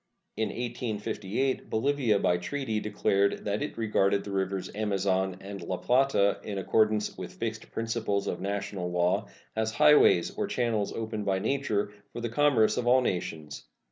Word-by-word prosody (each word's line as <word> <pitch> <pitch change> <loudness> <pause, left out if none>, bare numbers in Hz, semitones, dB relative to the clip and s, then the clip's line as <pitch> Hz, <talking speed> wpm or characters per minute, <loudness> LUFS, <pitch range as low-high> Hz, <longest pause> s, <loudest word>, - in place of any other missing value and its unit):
In 110 - -1
1858 115 0 -2
Bolivia 125 -2 +2
by 90 -3 +2
treaty 110 +3 -2
declared 100 -1 0
that 105 0 -1
it 145 - -4
regarded 100 -3 +2
the 100 - -7
rivers 95 -1 -2
Amazon 95 -3 0
and 100 -1 -7
La 90 +2 -3
Plata, 125 -5 +2
in 100 -2 -5
accordance 110 +2 +1
with 90 -1 -7
fixed 110 -1 -4
principles 115 -3 -1
of 90 - -3
national 100 -2 -3
law, 90 0 +1 0.3
as 110 0 -1
highways 105 -13 +5
or - - -1
channels 115 -4 0
opened 110 -2 -4
by 95 -1 +2
nature 105 -2 -1 0.2
for - - -5
the 120 0 -3
commerce 125 -4 +3
of 120 - -1
all 130 +1 +6
nations. 80 - -4
105 Hz, 155 wpm, -28 LUFS, 95-115 Hz, 0.3 s, all